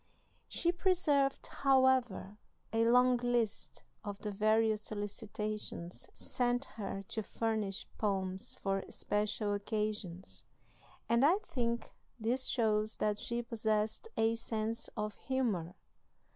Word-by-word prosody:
She 345 Hz, -, +2 dB
preserved, 325 Hz, -7 st, +2 dB
however, 260 Hz, -7 st, +2 dB, 0.3 s
a 225 Hz, 0 st, +3 dB
long 250 Hz, +1 st, +6 dB
list 240 Hz, -3 st, -1 dB, 0.2 s
of 205 Hz, -2 st, -4 dB
the 210 Hz, +1 st, -4 dB
various 215 Hz, +1 st, +3 dB
solicitations 210 Hz, -3 st, -4 dB
sent 245 Hz, +1 st, 0 dB
her 195 Hz, -4 st, -5 dB
to 220 Hz, -, -1 dB
furnish 215 Hz, -2 st, -2 dB
poems 190 Hz, -3 st, -1 dB
for 195 Hz, -1 st, -1 dB
special 210 Hz, 0 st, 0 dB
occasions, 205 Hz, -3 st, -2 dB, 0.6 s
and 235 Hz, +2 st, +4 dB
I 330 Hz, +7 st, +6 dB
think 235 Hz, -2 st, -2 dB, 0.3 s
this 245 Hz, +4 st, +1 dB
shows 215 Hz, -2 st, +2 dB
that 210 Hz, -1 st, 0 dB
she 240 Hz, 0 st, -1 dB
possessed 220 Hz, -, 0 dB
a 225 Hz, 0 st, +4 dB
sense 225 Hz, 0 st, -2 dB
of 210 Hz, 0 st, -1 dB
humor. 220 Hz, -11 st, -1 dB
220 Hz, 110 wpm, -34 LUFS, 205-245 Hz, 0.6 s, long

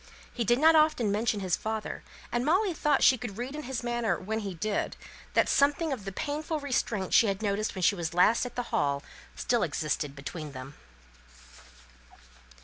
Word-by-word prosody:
He 240 Hz, -, -1 dB
did 240 Hz, +2 st, +3 dB
not 320 Hz, +4 st, +6 dB
often 305 Hz, -9 st, +3 dB
mention 215 Hz, 0 st, 0 dB
his 185 Hz, -3 st, +1 dB
father; 220 Hz, 0 st, -4 dB, 0.3 s
and 240 Hz, 0 st, 0 dB
Molly 365 Hz, +6 st, +2 dB
thought 300 Hz, -2 st, +1 dB
she 255 Hz, -, +6 dB
could 215 Hz, -4 st, -6 dB
read 250 Hz, +4 st, -4 dB
in 305 Hz, -, -4 dB
his 260 Hz, -2 st, -3 dB
manner, 240 Hz, -6 st, 0 dB
when 220 Hz, +4 st, -3 dB
he 200 Hz, -4 st, -5 dB
did, 205 Hz, +5 st, -2 dB, 0.4 s
that -, -, +4 dB
something 290 Hz, +2 st, +2 dB
of 220 Hz, -7 st, -7 dB
the 195 Hz, -, -4 dB
painful 300 Hz, -, -3 dB
restraint 235 Hz, -8 st, -1 dB
she 230 Hz, -, +6 dB
had 195 Hz, +2 st, -2 dB
noticed 210 Hz, +1 st, -1 dB
when 185 Hz, -, -4 dB
she 205 Hz, -, +5 dB
was 170 Hz, -4 st, -3 dB
last 180 Hz, +6 st, +4 dB
at 245 Hz, -, -12 dB
the 245 Hz, -, -1 dB
Hall 140 Hz, 0 st, +1 dB, 0.3 s
still 240 Hz, -2 st, 0 dB
existed 145 Hz, -2 st, -2 dB
between 145 Hz, +1 st, -7 dB
them. 130 Hz, +1 st, -8 dB
220 Hz, 185 wpm, -29 LUFS, 185-265 Hz, 0.4 s, not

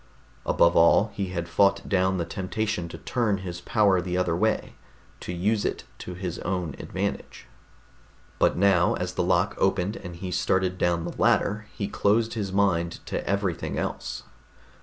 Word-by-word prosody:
Above 85 Hz, 0 st, +4 dB
all, 90 Hz, +6 st, +5 dB
he 100 Hz, -1 st, -2 dB
had 85 Hz, -2 st, -4 dB
fought 100 Hz, +3 st, +2 dB
down 95 Hz, -1 st, +2 dB
the 85 Hz, -, -1 dB
temptation 95 Hz, +1 st, -2 dB
to -, -, -8 dB
turn 115 Hz, -5 st, 0 dB
his 90 Hz, -2 st, -6 dB
power 100 Hz, -2 st, +3 dB
the 90 Hz, 0 st, -2 dB
other 90 Hz, -2 st, +1 dB
way, 110 Hz, +5 st, 0 dB, 0.5 s
to -, -, -6 dB
use 100 Hz, +5 st, 0 dB
it -, -, -2 dB, 0.2 s
to 90 Hz, -, -7 dB
his 90 Hz, -2 st, -4 dB
own 90 Hz, -5 st, -2 dB
advantage. -, -, -4 dB, 0.9 s
But -, -, +3 dB
now, 90 Hz, -2 st, +4 dB
as 90 Hz, 0 st, -3 dB
the -, -, -1 dB
lock 90 Hz, +2 st, +2 dB
opened 95 Hz, +2 st, +1 dB
and 90 Hz, -2 st, -8 dB
he 90 Hz, +2 st, -6 dB
started 90 Hz, +1 st, 0 dB
down 85 Hz, -1 st, +1 dB
the 85 Hz, -, -6 dB
ladder, 105 Hz, +1 st, +2 dB
he 100 Hz, -, -2 dB
closed 110 Hz, +2 st, +1 dB
his 105 Hz, -4 st, -3 dB
mind 90 Hz, -4 st, +1 dB
to -, -, -3 dB
everything 100 Hz, -4 st, -1 dB
else. -, -, -4 dB
95 Hz, 165 wpm, -26 LUFS, 90-100 Hz, 0.9 s, all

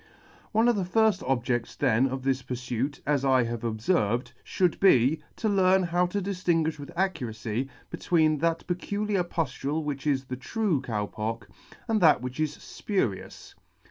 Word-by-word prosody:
One 225 Hz, +2 st, +3 dB
of 240 Hz, -, +4 dB
the 200 Hz, -, 0 dB
firfl 215 Hz, +1 st, +2 dB
objedls 120 Hz, -2 st, -1 dB
then 120 Hz, +5 st, +3 dB
of 130 Hz, 0 st, -4 dB
this 135 Hz, -1 st, 0 dB
purfuit, 125 Hz, +2 st, -3 dB
as 145 Hz, -2 st, +1 dB
I 130 Hz, -2 st, +4 dB
have 115 Hz, -1 st, -4 dB
obferved, 115 Hz, -, 0 dB
fhould 180 Hz, -3 st, 0 dB
be, 145 Hz, -5 st, +4 dB
to 225 Hz, -, -2 dB
learn 190 Hz, -2 st, +4 dB
how 175 Hz, +1 st, +1 dB
to 200 Hz, +3 st, -2 dB
diftinguifh. 170 Hz, -5 st, 0 dB
with 140 Hz, -, -8 dB
accuracy 125 Hz, -, -2 dB, 0.2 s
between 155 Hz, -3 st, +2 dB
that 165 Hz, +1 st, 0 dB
peculiar 200 Hz, +2 st, -1 dB
puftule 155 Hz, -2 st, -2 dB
which 145 Hz, -1 st, -4 dB
is 135 Hz, -2 st, +1 dB
the 130 Hz, -1 st, -6 dB
true 190 Hz, -, -1 dB
Cow 110 Hz, -6 st, -2 dB
Pock, 110 Hz, +2 st, -5 dB, 0.4 s
and 220 Hz, -3 st, +1 dB
that 160 Hz, -3 st, +6 dB
which 125 Hz, +3 st, -5 dB
is 155 Hz, -1 st, -1 dB
Jpurious. 160 Hz, -, -3 dB
150 Hz, 160 wpm, -27 LUFS, 125-180 Hz, 0.4 s, that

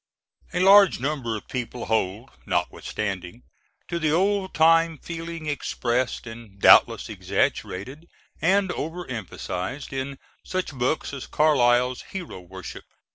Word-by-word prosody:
A 180 Hz, -, -1 dB
large 195 Hz, -, +7 dB
number 130 Hz, -5 st, -2 dB
of -, -, -12 dB
people 125 Hz, -1 st, -4 dB
hold, 110 Hz, +2 st, -1 dB, 0.2 s
notwithstanding, 95 Hz, -10 st, -3 dB, 0.4 s
to 170 Hz, -, -2 dB
the 155 Hz, -2 st, +1 dB
old 190 Hz, +3 st, +1 dB
time 165 Hz, +1 st, +4 dB
feeling 165 Hz, 0 st, -7 dB
expressed, 125 Hz, -4 st, -1 dB
and 115 Hz, -4 st, -11 dB
doubtless -, -, +6 dB
exaggerated 130 Hz, -, -2 dB, 0.3 s
and 195 Hz, +2 st, +3 dB
over 175 Hz, +3 st, -5 dB
emphasized, 110 Hz, +2 st, -5 dB
in 135 Hz, +1 st, -4 dB, 0.3 s
such 185 Hz, -4 st, -3 dB
books 130 Hz, +4 st, -1 dB
as 135 Hz, -2 st, -6 dB
Carlyle's 125 Hz, -4 st, +3 dB
Hero 180 Hz, -, -6 dB
Worship. 90 Hz, 0 st, -10 dB
135 Hz, 120 wpm, -25 LUFS, 115-165 Hz, 0.4 s, large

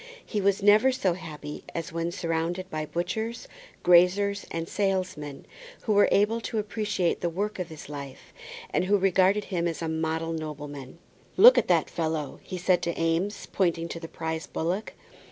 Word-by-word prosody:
He 210 Hz, -, -2 dB
was 195 Hz, 0 st, +1 dB
never 215 Hz, +6 st, +6 dB
so 200 Hz, -9 st, +1 dB
happy 150 Hz, -4 st, -8 dB
as 165 Hz, -1 st, -4 dB
when 165 Hz, +1 st, -2 dB
surrounded 170 Hz, +1 st, -2 dB
by 155 Hz, -1 st, -3 dB
butchers, 220 Hz, +9 st, -3 dB, 0.4 s
graziers, 190 Hz, +3 st, +4 dB
and 165 Hz, 0 st, -4 dB
salesmen 185 Hz, -8 st, -2 dB, 0.4 s
who 215 Hz, -, +1 dB
were 205 Hz, 0 st, +5 dB
able 220 Hz, +3 st, +3 dB
to 225 Hz, -, -4 dB
appreciate 210 Hz, -4 st, -1 dB
the 175 Hz, -, 0 dB
work 200 Hz, +4 st, -3 dB
of 180 Hz, -2 st, -3 dB
his 160 Hz, -2 st, -10 dB
life, 140 Hz, -2 st, -9 dB, 0.4 s
and -, -, +1 dB
who 205 Hz, +2 st, +3 dB
regarded 195 Hz, +2 st, +3 dB
him 175 Hz, -4 st, -1 dB
as 165 Hz, -, -3 dB
a 165 Hz, -, -3 dB
model 160 Hz, +1 st, -1 dB
nobleman. 150 Hz, -3 st, -7 dB, 0.4 s
"Look -, -, +9 dB
at -, -, -2 dB
that -, -, +3 dB
fellow," 160 Hz, -3 st, -3 dB
he 185 Hz, -, -6 dB
said 180 Hz, 0 st, +2 dB
to 170 Hz, -, -2 dB
Eames, 165 Hz, +5 st, 0 dB
pointing 170 Hz, -3 st, +1 dB
to 165 Hz, -, -5 dB
the 165 Hz, -, -7 dB
prize 160 Hz, 0 st, -4 dB
bullock. 180 Hz, +6 st, -2 dB
175 Hz, 170 wpm, -27 LUFS, 160-200 Hz, 0.4 s, Look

